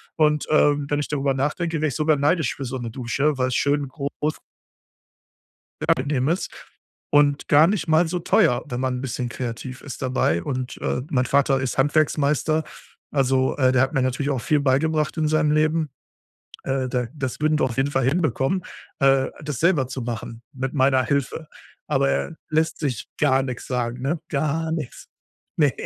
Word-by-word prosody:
und, 150 -1 +2
ähm, 145 -2 +3
wenn 145 0 +1
ich 145 - -2
darüber 140 -2 0
nachdenke, 155 +4 -1
wäre 155 - +2
ich 135 - -5
sogar 155 -1 +2
neidisch 145 -1 +1
für 135 - -5
so 130 +1 -4
'ne 120 -2 -5
Dusche, 135 +4 -1
weil 130 - +1
es 125 - -2
schön 145 -1 +1
groß 140 +2 -10 1.9
angenehm 135 0 +1
ist 170 +4 -1 0.6
und 145 -1 +3
gar 150 +2 +7
nicht 180 -4 -1
mal 160 +2 +4
so 180 +2 -1
teuer, 125 -6 +3
wenn 125 -3 -4
man 130 -1 0
'n - - -5
bisschen 125 -1 -3
kreativ 125 +1 -6
ist 140 -1 -8
dabei. 125 -10 +1
Und, 130 -3 -4
äh, 125 - -2
mein 130 -2 +1
Vater 135 +1 +2
ist 130 0 -3
Handwerksmeister. 150 +2 +2 0.5
Also, 130 -2 +1
äh, 130 -2 +4
der 130 0 +4
hat 130 - 0
mir 135 - +2
natürlich 130 +3 -1
auch 130 - -1
viel 150 +4 +1
beigebracht 150 +4 +1
in 155 - +2
seinem 155 -1 +2
Leben. 155 0 +1 0.7
Äh, 135 -1 -1
da 125 -1 -1
das 130 -3 -4
würden 155 0 +2
wir - - +4
auf 125 -3 -2
jeden 135 +1 +1
Fall 135 - +1
hinbekommen, 155 +2 0 0.3
äh, 135 -2 +4 0.2
das 150 -5 -4
selber 165 -6 +3
zu 130 0 -5
machen 115 0 -6
mit 130 -1 -4
meiner 130 -1 +3
Hilfe. 140 +3 -2 0.4
Aber - - +2
er 70 0 -2
lässt 160 +1 +1
sich 130 -8 -3
gar 135 -2 +3
nichts 125 -2 -6
sagen, 125 -1 -2
ne? 150 +5 -1
Gar 155 +3 -1
nichts. 155 -6 -5 0.5
Ne. 145 -4 +3
140 Hz, 185 wpm, -23 LUFS, 130-155 Hz, 1.9 s, gar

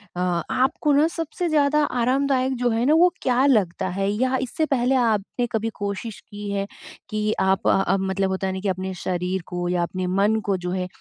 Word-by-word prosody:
अ, - - -4
आपको 180 - 0
ना 295 +3 +4
सबसे 330 +1 -3
ज़्यादा 300 0 +3
आरामदायक 260 +1 +1
जो 245 0 +1
है 230 +1 0
ना 295 - +4
वो 350 +2 +5
क्या 255 +1 +2
लगता 195 -8 +2
है? 195 +2 -1
या 255 +5 +1
इससे 265 +5 -1
पहले 265 -2 +1
आपने 235 0 0
कभी 225 0 -1
कोशिश 205 +2 -4
की 205 -1 -8
है 200 0 -1 0.4
कि 215 0 -1
आप 190 0 +1
अ - - +5
अ, - - +3
मतलब 190 0 0
होता 190 0 -2
है 190 - -2
ना 190 - -4
कि 200 - -3
अपने 190 0 -3
शरीर 180 +1 -1
को 175 0 -3
या 175 -1 +1
अपने 185 +1 -3
मन 200 +4 +2
को 195 -2 +1
जो 180 0 -4
है, 180 0 -2
210 Hz, 215 wpm, -23 LUFS, 190-260 Hz, 0.4 s, वो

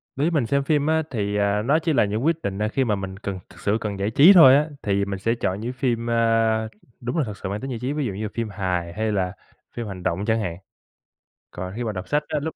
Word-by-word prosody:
Đối 140 - 0
với 170 - +1
mình 150 -7 +1
xem 140 +2 +1
phim 145 0 +1
á 160 0 +2
thì, 105 -4 -2
à, 100 0 +1
nó 140 +8 +2
chỉ 165 -1 0
là 120 - +4
những 105 +5 -2
quyết 165 0 +1
định, 100 -6 -3
à, 105 - +2
khi 135 +5 0
mà 110 -5 +1
mình 95 -1 -6
cần 100 -3 -4
thực - - -16
sự 105 +2 +1
cần 100 -2 -4
giải 100 +2 -1
trí 155 - +8
thôi 155 -8 +9
á, 150 +2 +3
thì 100 -1 0
mình 100 -1 -4
sẽ 115 +4 +1
chọn 95 -3 -1
những 120 +4 -4
phim, 120 -2 -1
a, 115 -1 +2 0.3
đúng 120 +5 -3
là 155 - +2
thực 105 -5 -6
sự - - -5
mang 100 +2 -4
tính 135 - -5
giải 120 - -4
trí, 130 +4 -2
ví 150 -2 -1
dụ 105 - -3
như 100 +3 -5
là 105 - -3
phim 115 -2 -3
hài, 90 -3 -2
hay 110 +2 -1
là 95 -3 0 0.4
phim 120 -2 -5
hành 95 -3 -7
động 90 +5 -1
chẳng 110 0 +1
hạn. 85 -5 -4 0.9
Còn 90 +1 -6
khi 120 - -3
mà 110 - -2
đọc 95 -2 -6
sách 150 0 +1
á 155 -1 -1
lúc 160 +2 -4
110 Hz, 290 wpm, -23 LUFS, 100-135 Hz, 0.9 s, thôi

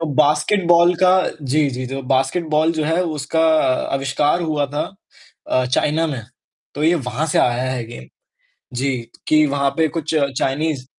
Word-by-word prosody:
तो 165 - -2
बास्केटबॉल 170 +4 +3
का 185 - +6 0.3
जी, 145 +2 +1
जी, 130 0 -5
जो 135 +2 -5
बास्केटबॉल 155 +4 +1
जो 155 -2 -2
है 165 +4 +1
उसका 155 0 -2
अ, 160 -5 +2
अविष्कार 135 +5 0
हुआ 150 -3 -1
था 145 +2 -4 0.7
अ, 130 - +2
चाइना 150 +5 +1
में। 135 -6 -4 0.5
तो 145 - -4
ये 170 +2 +4
वहाँ 135 +1 -2
से - - 0
आया 125 +1 +1
है 125 -3 -4
गेम 115 - -10 0.7
जी, 135 0 0 0.3
कि 155 0 +4
वहाँ 140 -1 0
पे 160 -1 +3
कुछ 160 +1 -4
चाइनीज़ 140 0 -1
150 Hz, 165 wpm, -19 LUFS, 135-160 Hz, 0.7 s, का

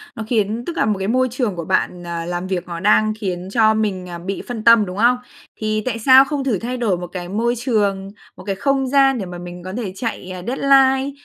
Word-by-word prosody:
nó 225 - -5
khiến 225 0 -1
tức 340 - -5
là - - +2
một 210 -2 0
cái 190 - -2
môi 255 +3 +2
trường 240 -7 -2
của 170 - -5
bạn, 180 -1 -1
à, 170 -1 -4
làm 175 +1 -4
việc 185 -2 -3
nó 170 -1 -5
đang 215 +3 +3
khiến 185 -3 -4
cho 220 0 +4
mình, 195 -4 -2
à, 170 - -6
bị 190 +3 -5
phân 235 -3 -5
tâm, 230 -2 +6
đúng 180 +1 -7
không? 240 +3 +4 0.4
Thì 215 0 -2
tại 230 -2 -2
sao 260 +3 +7
không 285 -1 -3
thử 225 -9 0
thay 250 +2 -4
đổi 215 -7 0
một 175 0 -6
cái 175 -1 -7
môi 235 +5 0
trường, 205 -5 0 0.3
một - - -11
cái 195 -1 -3
không 270 +4 0
gian 270 -1 +4
để 195 - -4
mà 180 -1 -8
mình 175 0 -9
có 185 +1 -7
thể 205 -6 -4
chạy, 220 -4 -5
à, 185 - -7
deadline 270 +1 +3
215 Hz, 250 wpm, -20 LUFS, 185-245 Hz, 0.4 s, sao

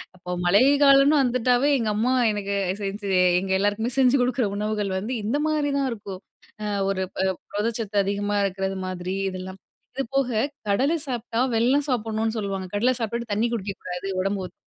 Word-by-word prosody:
அப்ப 180 0 -5
மழை 195 +5 +5 0.2
காலம்னு 275 +2 +6
வந்துட்டாவே 250 +2 +2
எங்க 225 -3 -1
அம்மா 245 +4 +1 0.2
எனக்கு 200 -1 -3 0.3
செஞ்சு 200 0 -4 0.3
எங்க 190 0 -4
எல்லாருக்குமே 205 +4 0
செஞ்சு 260 +1 +5
குடுக்ற 245 -1 +1
உணவுகள் 210 -1 -2
வந்து 220 +7 -3
இந்த 235 +8 0
மாரிதான் 285 -3 0
இருக்கும். 200 -4 -7 0.4
அ - - -2 0.2
ஒரு 190 -1 -1
ப - - -6 0.3
புரதச்சத்து 215 0 -2
அதிகமா 205 +1 -1
இருக்குறது 190 0 -2
மாதிரி 185 +1 -4
இதெல்லாம். 185 +1 -7 0.4
இது 270 - -1
போக, 270 -2 +2 0.4
கடல 270 +11 +2
சாப்ட்டா 240 -1 -2
வெல்லம் 270 +6 +2
சாப்பிடணும்னு 225 -2 -1
சொல்லுவாங்க. 195 -2 -3
கடலை 245 +5 +3
சாப்ட்டுட்டு 235 0 -3
தண்ணி 225 +3 +1
குடிக்கக் 200 -3 -4
கூடாது. 180 +1 -5
உடம்பு 195 0 -1
ஒத் - - -19
215 Hz, 160 wpm, -24 LUFS, 195-250 Hz, 0.4 s, காலம்னு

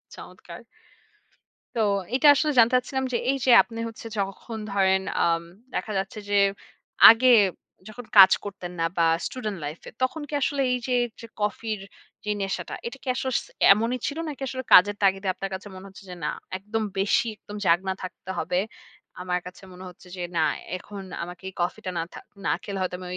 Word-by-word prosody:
চমৎকার - - -11 1.2
তো - - -1 0.4
এটা 265 +3 +4
আসলে 305 +2 +1
জানতে 230 +2 +5
চাচ্ছিলাম 265 +1 -2
যে, - - +3
এই 275 - +2
যে 255 - +5
আপনি 230 -1 -9
হচ্ছে 225 0 -9
যখন 200 +4 -4
ধরেন 190 -1 +3 0.2
আম 165 0 +1 0.3
দেখা 215 - -3
যাচ্ছে 195 +3 -4
যে, 205 - +1 0.7
আগে 230 +3 +6 0.6
যখন 235 +3 -9
কাজ 190 -1 +10
করতেন 190 -3 -7
না, 165 - +2
বা 170 - +3 0.2
স্টুডেন্ট 215 -6 -4
লাইফ 150 +3 -6
এ - - -8
তখন 260 +5 0
কি - - -9
আসলে 280 +1 0
এইযে, 250 0 -2 0.3
যে - - -8
কফির 210 +1 -2 0.5
যে 210 - 0
নেশাটা 195 -1 -3
এটা 245 - -7
কি - - -14
আসলে 260 0 -2
স - - -11 0.3
এমনই 230 +5 -1
ছিল? 285 - -4
নাকি 280 -3 -8
আসলে 260 0 -5
কাজের 205 +3 +8
তাগিদে 195 0 +2
আপনার 195 +1 -5
কাছে 190 +2 -6
মনে 185 +1 -10
হচ্ছে 195 +1 -14
যে, 180 - -7
না - - 0 0.3
একদম 210 +3 -3
বেশি 195 +4 +2
একদম 205 - -11
জাগনা 185 +3 +2
থাকতে 185 0 -9
হবে, 180 +2 0 0.6
আমার 180 0 -1
কাছে 180 +2 -11
মনে 180 +1 -11
হচ্ছে 180 +1 -17
যে, 180 - -6 0.2
না - - +3 0.4
এখন 200 +2 -9 0.2
আমাকে 175 +1 -9
এই - - -15
কফিটা 180 +1 -2
না - - 0
থা - - -8 0.3
না - - +2
খেলে, 200 -2 -5
হয়তো 185 -1 -2
আমি 180 - -8
200 Hz, 185 wpm, -25 LUFS, 185-235 Hz, 1.2 s, কাজ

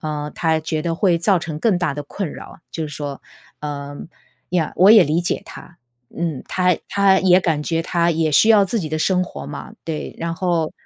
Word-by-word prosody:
呃， 150 -1 -4
他 160 -1 +1
觉 155 0 -3
得 165 0 -1
会 175 0 +2
造 190 +2 +3
成 160 -2 -5
更 195 +1 +2
大 175 -5 -1
的 145 - -5
困 160 +3 -5
扰， - - -11
就 165 - -4
是 - - -8
说 145 -1 -6 0.4
嗯， 145 -1 -6 0.4
呀， 170 -3 0
我 190 +4 +7
也 215 -4 +8
理 155 +4 +1
解 175 - -2
他。 170 - -13 0.4
嗯， 165 -5 -3
他 180 -1 +2
他 195 -1 +3
也 185 -1 +5
感 160 -5 0
觉 165 +1 -1
他 170 0 +1
也 160 -2 0
需 215 - +5
要 215 -3 +6
自 220 +3 -1
己 160 - -4
的 155 +1 -2
生 180 +3 +2
活 180 - -7
嘛， - - -8
对， 160 -2 -5
然 165 0 -3
后 170 -3 0
165 Hz, 225 characters per minute, -20 LUFS, 155-180 Hz, 0.4 s, 也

